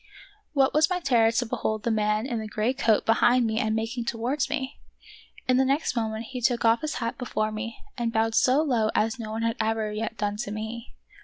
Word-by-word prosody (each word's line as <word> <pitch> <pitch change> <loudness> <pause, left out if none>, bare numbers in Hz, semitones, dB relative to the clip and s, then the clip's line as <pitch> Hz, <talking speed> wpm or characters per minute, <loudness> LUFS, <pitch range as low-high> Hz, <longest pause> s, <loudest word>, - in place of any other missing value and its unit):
What 270 -2 +3
was 310 +2 +4
my 365 -1 0
terror 235 -8 +3
to 235 +2 0
behold 215 -1 -2
the 235 - 0
man 215 0 +1
in 240 -4 -2
the 220 - -5
gray 215 +4 0
coat 230 -6 +2
behind 240 +2 +4
me 220 0 0
and 220 -3 0
making 225 +2 -2
towards 240 +5 -1
me! 265 0 -3 0.7
In 255 -1 +4
the 265 - +4
next 275 0 0
moment 220 -1 -2
he 250 -1 -5
took 240 -1 +1
off 230 +1 +4
his 310 0 -3
hat 230 +1 -3
before 215 -3 -1
me 225 +2 -5 0.2
and 235 -1 0
bowed 225 0 +1
so 260 +6 +4
low 235 -7 +1
as 225 +3 +1
no 220 -2 -5
one 220 +1 -3
had 230 0 0
ever 220 -1 -1
yet 225 +1 -4
done 205 0 -2
to 215 -1 -4
me. 220 +3 -6
230 Hz, 225 wpm, -26 LUFS, 220-250 Hz, 0.7 s, was